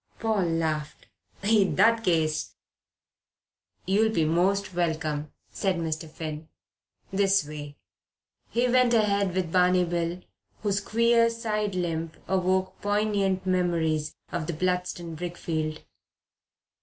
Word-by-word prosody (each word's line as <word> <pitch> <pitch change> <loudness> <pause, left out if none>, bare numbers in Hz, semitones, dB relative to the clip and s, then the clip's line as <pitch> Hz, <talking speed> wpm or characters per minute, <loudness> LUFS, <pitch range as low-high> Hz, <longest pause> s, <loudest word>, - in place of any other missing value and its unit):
Paul 220 -4 +1
laughed. 160 -2 -2 0.4
"In 205 -2 +3
that 230 0 +4
case 160 -5 0 0.6
" - - -49
"You'll 210 +4 +3
be 165 -7 +1
most 185 +5 +1
welcome," 155 -3 -1 0.2
said 195 -2 0
Mr. 160 -1 -3
Finn. 155 0 -6 0.7
"This 195 -4 +3
way." 145 -1 -8 0.7
He 240 +2 +1
went 250 -1 +4
ahead 200 -4 +2
with 180 -3 -1
Barney 180 0 +4
Bill, 170 +1 -2 0.4
whose 200 -1 +1
queer 230 +2 +3
side 215 -3 -2
limp 165 -2 -2
awoke 185 0 0
poignant 205 -2 0
memories 165 -4 0 0.2
of 165 -3 -3
the 170 - -2
Bludston 180 0 -2
brickfield. 160 -2 -3
180 Hz, 115 wpm, -27 LUFS, 160-200 Hz, 0.7 s, that